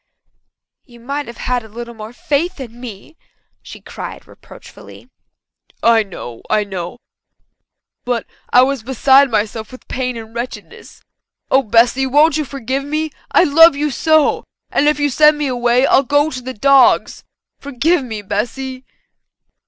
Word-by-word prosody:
"You 240 -3 -18
might 280 +5 -5
have 235 - -10
had 250 -1 -2
a - - -12
little 235 +2 -8
more 220 0 -9
faith 305 +7 -2
in 240 -2 -9
me," 240 +6 -10 0.4
she - - -12
cried - - -9
reproachfully. - - -15 0.7
"I 230 -1 +5
know 170 - -9
I 210 - +2
know. 190 +1 -6 1.1
But 245 -2 -2 0.2
I 250 - +6
was 275 -1 -1
beside 265 +3 +4
myself 220 0 -2
with 255 - -14
pain 250 -1 -3
and 225 0 -10
wretchedness. 240 +2 -8 0.5
Oh, 265 - +5
Bessy, 235 +3 +2
won't 295 +3 +4
you 305 - -2
forgive 270 0 -4
me? 305 +2 -3 0.2
I - - +5
love 325 0 +6
you 295 +1 -1
so! 315 +3 +2 0.3
If 295 +1 +2
you 290 -1 0
send 300 +2 +4
me 295 - -2
away 245 0 +1
I'll 270 - +4
go 290 +3 +1
to 255 - -6
the 260 +1 -7
dogs. 275 +3 +3 0.4
Forgive 285 +4 0
me, 220 -4 -6
Bessy." 255 +6 -4
255 Hz, 150 wpm, -17 LUFS, 235-285 Hz, 1.1 s, I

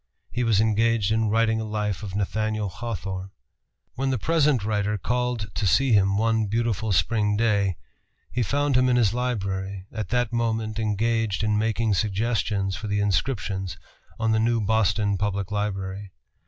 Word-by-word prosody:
He 125 +2 -1
was 110 -4 +3
engaged 110 -1 +2
in 110 -1 +2
writing 110 0 +2
a - - -2
life 105 -2 -2
of 100 -2 -6
Nathaniel 110 +1 -1
Hawthorne. 95 -3 -5 0.6
When 135 +1 -1
the 130 - +1
present 150 -3 +2
writer 105 -1 0
call 125 +3 -1
to 105 -1 -3
see 125 +7 +3
him 100 -1 +4
one 110 0 +1
beautiful 110 -1 -1
spring 105 +1 +2
day, 100 -5 +2 0.6
he 125 - -1
found 140 +4 +1
him 130 0 +4
in 125 - +3
his 115 -4 +3
library, 100 -6 -2
at 110 -4 -4
that 120 -1 0
moment 115 -2 -1
engaged 110 -1 0
in 105 -1 +2
making 110 0 +1
suggestions 100 -1 0
for 105 +1 -6
the 105 0 0
inscriptions 100 -2 -1 0.4
on 110 -1 +1
the 110 - +3
new 115 +1 +2
Boston 105 -2 +1
Public 100 -1 -2
Library. 100 -1 -3
110 Hz, 160 wpm, -25 LUFS, 100-115 Hz, 0.6 s, him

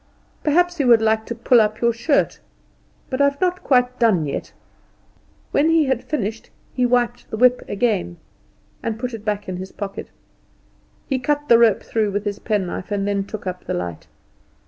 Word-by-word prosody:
Perhaps 350 +3 +2
you 275 - +2
would 235 -2 +7
like 220 0 +1
to 235 - -4
pull 235 0 +4
up 215 0 0
your 235 0 +2
shirt? 280 +6 +1 0.7
But 260 +1 0
I've 280 0 +2
not 365 0 0
quite 250 -1 +2
done 210 -10 +3
yet." 140 - -4 1.0
When 300 +3 +3
he 325 -2 +4
had 265 -1 -1
finished 225 -7 -3 0.2
he 250 -1 +1
wiped 245 -1 0
the 220 - -4
whip 250 +2 +4
again, 195 - -1 0.6
and 225 -1 -3
put 250 +1 -4
it 220 -2 -7
back 210 -1 -2
in 185 -1 -4
his 190 +1 -7
pocket. 200 -2 -6 1.0
He 265 -2 -1
cut 295 +3 -1
the 235 - +7
rope 230 -3 +4
through 220 -2 0
with 205 +1 -2
his 205 -1 -3
penknife, 195 -4 -2
and 200 -1 -1
then 200 -1 0
took 210 0 -8
up 180 -1 -5
the - - -2
light. 90 -2 -5
230 Hz, 185 wpm, -21 LUFS, 205-255 Hz, 1.0 s, would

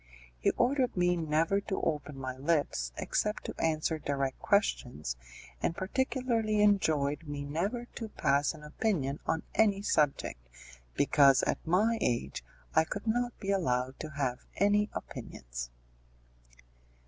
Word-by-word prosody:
He - - +3
ordered 250 -2 +2
me 180 0 +3
never 165 +4 +1
to 195 -1 -3
open 150 -2 -2
my 130 -1 -4
lips 140 - 0
except 210 0 -1
to - - -5
answer 160 0 +1
direct 140 -2 -2
questions, 120 - 0 0.5
and 165 - 0
particularly 230 0 0
enjoined 155 -7 +2
me 145 -1 -4
never 195 - -2
to 225 -2 -5
pass 140 -3 +1
an 150 - -13
opinion 150 -4 -1
on 160 0 0
any 200 -2 +3
subject, 145 - +1 0.6
because 140 -2 +5
at - - 0
my 215 +7 +3
age 115 - -1 0.3
I 160 - +5
could 205 +6 -5
not 240 +2 0
be 195 -1 -2
allowed 130 -8 0
to 155 - -5
have 135 -4 -2 0.2
any 205 +2 +3
opinions. - - -6
160 Hz, 135 wpm, -31 LUFS, 140-205 Hz, 0.6 s, because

